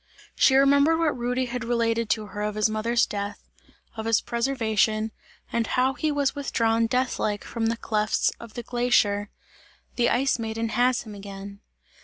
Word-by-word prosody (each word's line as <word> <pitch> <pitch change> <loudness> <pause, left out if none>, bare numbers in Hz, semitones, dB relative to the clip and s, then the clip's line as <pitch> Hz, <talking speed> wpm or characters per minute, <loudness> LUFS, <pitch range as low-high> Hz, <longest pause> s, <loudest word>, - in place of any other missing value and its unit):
She 265 - +4
remembered 280 +4 +5
what 325 -4 +1
Rudy 250 +1 -1
had 250 -1 -4
related 230 -1 0
to 215 -1 0
her 205 +1 -7
of 210 0 -2
his 215 0 +3
mother's 225 +2 +1
death, 205 0 -5 0.5
of 220 0 -5
his 225 -1 +4
preservation, 225 -3 0 0.4
and 230 -1 0
how 255 +1 +1
he 305 +3 -1
was 285 -2 +1
withdrawn 230 -5 +1
death 250 +2 0
like, 205 -1 -1
from 225 -1 -2
the 230 0 0
clefts 215 -1 0
of 230 -2 -11
the 240 - -5
glacier. 215 -4 +1 0.7
"The 240 -1 +3
Ice 265 0 +1
Maiden 225 0 -3
has 245 +2 +2
him 215 -3 -10
again!" 200 0 -9
230 Hz, 170 wpm, -25 LUFS, 215-250 Hz, 0.7 s, remembered